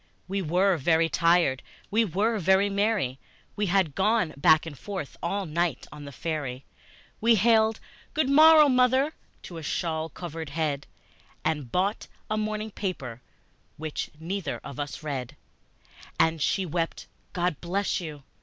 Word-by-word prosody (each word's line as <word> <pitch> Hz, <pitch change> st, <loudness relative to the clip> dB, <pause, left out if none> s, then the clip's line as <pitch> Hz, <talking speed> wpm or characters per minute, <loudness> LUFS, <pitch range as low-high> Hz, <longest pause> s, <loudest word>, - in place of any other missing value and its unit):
We 195 Hz, +1 st, -2 dB
were 180 Hz, +2 st, +2 dB
very 165 Hz, +2 st, +2 dB
tired, 165 Hz, -6 st, +3 dB, 0.3 s
we 225 Hz, +3 st, +4 dB
were 210 Hz, +3 st, 0 dB
very 190 Hz, +3 st, +3 dB
merry, 200 Hz, -, 0 dB, 0.4 s
We 205 Hz, 0 st, 0 dB
had 180 Hz, -5 st, +2 dB
gone 195 Hz, -2 st, +1 dB
back 155 Hz, +3 st, +4 dB
and 160 Hz, -3 st, -7 dB
forth 185 Hz, -1 st, -6 dB
all 195 Hz, +3 st, -1 dB
night 165 Hz, -3 st, -1 dB
on 150 Hz, -1 st, -9 dB
the 140 Hz, -, -8 dB
ferry, 140 Hz, -2 st, -4 dB, 0.6 s
We 230 Hz, +1 st, +5 dB
hailed 220 Hz, +1 st, +3 dB, 0.4 s
"Good 305 Hz, -3 st, +2 dB
morrow, 310 Hz, +2 st, +8 dB
mother!" 260 Hz, +3 st, +3 dB, 0.3 s
to 170 Hz, -, -8 dB
a -, -, -6 dB
shawl 160 Hz, +1 st, -2 dB
covered 165 Hz, -3 st, -7 dB
head, 145 Hz, -2 st, -2 dB, 0.6 s
And 150 Hz, -6 st, -1 dB
bought 195 Hz, +4 st, 0 dB, 0.2 s
a -, -, +2 dB
morning 215 Hz, 0 st, -2 dB
paper, 135 Hz, -, -5 dB, 0.6 s
which 155 Hz, -1 st, -4 dB
neither 170 Hz, -2 st, -3 dB
of 140 Hz, -, -8 dB
us 145 Hz, +1 st, -5 dB
read; 135 Hz, -5 st, -4 dB, 0.8 s
And 160 Hz, -1 st, +3 dB
she 190 Hz, +6 st, +1 dB
wept, 165 Hz, 0 st, -3 dB, 0.3 s
"God 175 Hz, -4 st, -1 dB
bless 195 Hz, +4 st, -1 dB
you!" 150 Hz, -4 st, -8 dB
175 Hz, 145 wpm, -27 LUFS, 155-205 Hz, 0.8 s, morrow